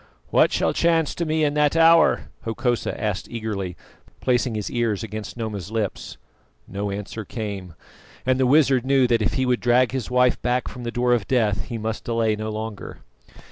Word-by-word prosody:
"What - - +4
shall - - +1
chance 165 -2 +2
to 170 - -3
me 155 0 +1
in 145 -1 +2
that 150 0 +2
hour?" 165 0 +5
Hokosa 120 +1 -1
asked 105 -3 -2
eagerly, 105 -6 -4 0.4
placing 125 -2 +1
his 105 -2 -3
ears 115 -4 -1
against 110 +1 -6
Noma's 105 -6 -4
lips. 110 -3 -3 0.5
No 100 +1 -4
answer 105 +2 -5
came; 100 -5 -6 0.5
and 130 0 +2
the 130 - +3
wizard 135 -3 +4
knew 135 -1 +3
that 120 -2 +2
if 105 - 0
he 130 - +1
would 125 -1 +1
drag 120 0 +3
his 130 -2 -3
wife 125 0 +2
back 125 +1 0
from 125 -1 -8
the 120 - -2
door 125 0 +2
of 115 -5 0
death 110 -6 +1
he 120 - -5
must 110 0 -4
delay 115 -2 0
no 110 +1 -4
longer. 110 -1 -6
120 Hz, 185 wpm, -23 LUFS, 110-130 Hz, 0.5 s, hour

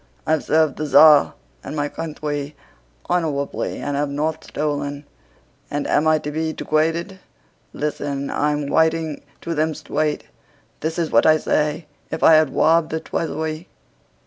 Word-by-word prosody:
I've 155 -1 +1
served 155 -3 +2
the 155 - -3
Tsar 150 +1 +6 0.3
and - - -6
my 145 -1 -1
countwy 150 -2 -5 0.5
honowably 150 -5 -1
and 145 0 -3
have 145 0 -1
not 155 +3 -2
stolen! 145 -1 -3 0.6
And 145 0 -2
am 155 +2 +2
I 155 0 +4
to 150 -1 -5
be 160 +1 -2
degwaded?... 165 +5 -1 0.5
Listen, 145 -2 -3
I'm 150 0 0
w'iting 160 0 +1 0.2
to 170 - -3
them 155 0 0
stwaight. 150 -1 -2 0.6
This 160 +2 -3
is 165 -2 -1
what - - +4
I 155 0 +6
say: 150 +1 -1 0.2
'If - - -4
I 160 - +8
had 155 -2 +5
wobbed 160 +4 +3
the 160 - -2
Tweasuwy... 160 +1 -4
155 Hz, 145 wpm, -21 LUFS, 145-160 Hz, 0.6 s, I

